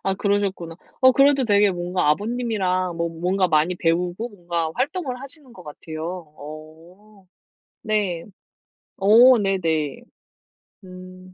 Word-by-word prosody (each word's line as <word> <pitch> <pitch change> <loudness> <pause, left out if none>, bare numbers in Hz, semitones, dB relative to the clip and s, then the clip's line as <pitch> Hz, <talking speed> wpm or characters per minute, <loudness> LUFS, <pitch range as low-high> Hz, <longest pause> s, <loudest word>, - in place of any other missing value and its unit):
아 195 0 0
그러셨구나. 195 -5 -2 0.2
어 260 0 +7
그래도 275 0 +4
되게 205 -2 +4
뭔가 175 -2 -1
아버님이랑 190 -2 -1
뭐 170 0 -1
뭔가 180 +3 0
많이 160 +3 +2
배우고 175 +6 -1
뭔가 170 -4 -3
활동을 270 -2 -3
하시는 275 -2 -10
것 185 - -13
같아요. 155 0 -9 0.3
어 165 +7 -13 0.6
네 205 -6 -1 0.7
어 235 +6 +6
네네 165 -7 -1 0.8
음 185 0 -13
185 Hz, 240 characters per minute, -22 LUFS, 170-215 Hz, 0.8 s, 어